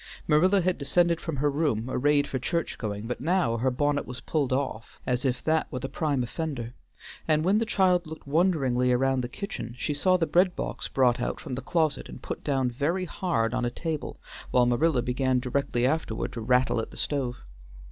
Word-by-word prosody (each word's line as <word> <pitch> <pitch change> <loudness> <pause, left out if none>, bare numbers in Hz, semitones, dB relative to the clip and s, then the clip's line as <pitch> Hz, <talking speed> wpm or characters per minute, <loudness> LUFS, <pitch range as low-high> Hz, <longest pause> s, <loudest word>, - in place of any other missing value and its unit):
Marilla 185 +6 +4
had 180 -1 0
descended 170 +4 +2
from 165 - -3
her 145 +2 +1
room 140 -7 0
arrayed 145 +2 +2
for 135 -2 -3
church 170 +6 -2
going, 105 -1 -4
but 125 +1 -4
now 165 -7 +1
her 130 +3 +1
bonnet 145 +3 0
was 125 0 -6
pulled 145 -3 -1
off 130 -5 -3
as 125 +1 0
if 125 -1 0
that 160 0 +1
were - - -3
the 130 - -3
prime 145 -4 -1
offender, 120 -3 -4 0.5
and 155 0 +2
when 200 +4 +4
the 230 - -1
child 180 -5 +2
looked 160 0 -9
wonderingly 140 -6 +2
around 130 +1 +2
the 120 - -4
kitchen, 120 - -6
she 145 - -2
saw 185 +5 +3
the 170 - +1
bread 180 +3 +3
box - - -4
brought 125 -2 +2
out - - -2
from 140 - -7
the 130 - -3
closet 155 +2 0
and - - -10
put - - -5
down 135 -4 +1
very 165 +9 -1
hard 155 - -1
on 125 -1 0
a 120 - +1
table, 155 +4 -4 0.3
while 125 -1 +4
Marilla 125 +2 +2
began 130 +1 +1
directly 125 -1 0
afterward 135 -5 -1
to 115 - -5
rattle 125 +1 +2
at - - -6
the - - -13
stove. 135 -4 -1
140 Hz, 205 wpm, -27 LUFS, 125-160 Hz, 0.5 s, Marilla